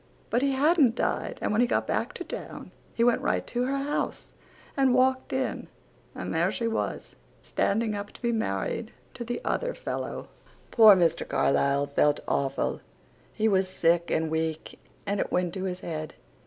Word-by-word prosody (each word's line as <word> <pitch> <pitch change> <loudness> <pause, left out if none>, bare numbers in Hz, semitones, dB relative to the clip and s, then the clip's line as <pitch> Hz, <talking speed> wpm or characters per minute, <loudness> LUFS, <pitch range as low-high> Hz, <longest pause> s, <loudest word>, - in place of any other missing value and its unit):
But 240 - +2
he 275 0 +2
hadnt 280 -3 +4
died - - -1
and - - 0
when 215 +3 +3
he 245 - +4
got - - 0
back - - -1
to - - -5
town - - -8 0.2
he 230 - +2
went 240 0 +3
right - - 0
to 245 0 -1
her 275 +2 -1
house 285 +2 -3 0.4
and 265 -2 +3
walked 260 0 +2
in 260 0 -2 0.5
and - - -4
there 165 +3 +2
she 230 +3 -2
was 225 - -3 0.3
standing 220 +2 0
up 205 0 -5
to - - -15
be 235 - +2
married 220 - -2 0.2
to 240 - -6
the 240 +1 -3
other - - -1
fellow. - - -5 0.4
Poor 220 -4 +8
Mr. 170 -3 +1
Carlisle 140 +1 +2
felt 145 +1 +2
awful. 135 -1 -1 0.5
He 220 0 0
was 190 -2 +2
sick 170 -1 +2
and 160 0 0
week 160 0 -3 0.3
and 200 0 -1
it - - -2
went 180 -1 0
to 190 0 -4
his 185 -1 -4
head. 155 -2 -5
215 Hz, 180 wpm, -27 LUFS, 165-250 Hz, 0.5 s, Poor